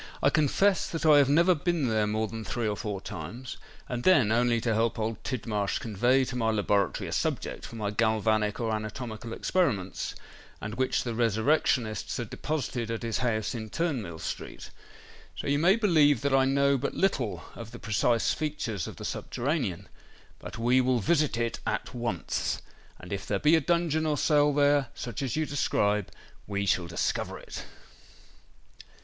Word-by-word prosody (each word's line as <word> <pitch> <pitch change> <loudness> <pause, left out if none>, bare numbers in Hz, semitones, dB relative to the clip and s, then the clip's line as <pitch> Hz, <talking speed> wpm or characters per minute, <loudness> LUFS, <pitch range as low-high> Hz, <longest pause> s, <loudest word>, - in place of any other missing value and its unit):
"I - - +5
confess 175 +6 +2
that 165 -1 -3
I 150 -2 +7
have 140 -1 +4
never 170 +5 +5
been 165 -3 0
there 110 -2 +1
more 110 +1 0
than 110 +1 -6
three 115 +2 -2
or 105 - 0
four 105 -3 -4
times—and 120 +6 -7
then 140 - +5
only 120 0 +3
to 115 -1 +1
help 115 +2 +1
old 110 0 -3
Tidmarsh 105 -5 -2
convey 120 +5 +2
to 125 0 -5
my 115 -2 +1
laboratory 105 -2 +1
a - - -5
subject - - -2
for - - -10
my 105 -2 -2
galvanic 110 -1 +1
or 115 -2 -1
anatomical 110 +1 -5
experiments, 115 - -1 0.4
and 105 +1 -5
which 130 +2 0
the 120 - -3
resurrectionists 115 0 +1
had 120 -4 -5
deposited 130 -6 -3
at 115 0 -3
his 115 -2 -1
house 110 -3 0
in 110 -2 -5
Turnmill 125 - -2
Street. - - -6 0.6
So - - -6
you 140 +1 +2
may 180 +5 +5
believe 155 - +4
that 140 -1 0
I 135 0 +5
know 140 0 +3
but - - -3
little 135 - 0
of 115 -2 -8
the 120 - -10
precise 115 +1 +1
features 120 - -3
of - - -8
the - - -8
subterranean. 125 - -2 0.5
But - - -8
we 120 +3 +3
will 130 0 +2
visit 145 - +1
it 115 -1 -1
at - - -2
once; 115 -8 -2 0.3
and - - -8
if 100 - -4
there 100 - +1
be 150 +9 +4
a 160 - +3
dungeon 160 0 +1
or 150 -1 +1
cell 150 0 +3
there, 145 -1 +3
such 120 0 -5
as 130 -4 -2
you 155 0 +1
describe, 105 -8 0 0.4
we 100 -1 -1
shall 90 -3 +1
discover 85 - -2
it." - - -8
120 Hz, 175 wpm, -28 LUFS, 110-145 Hz, 0.6 s, I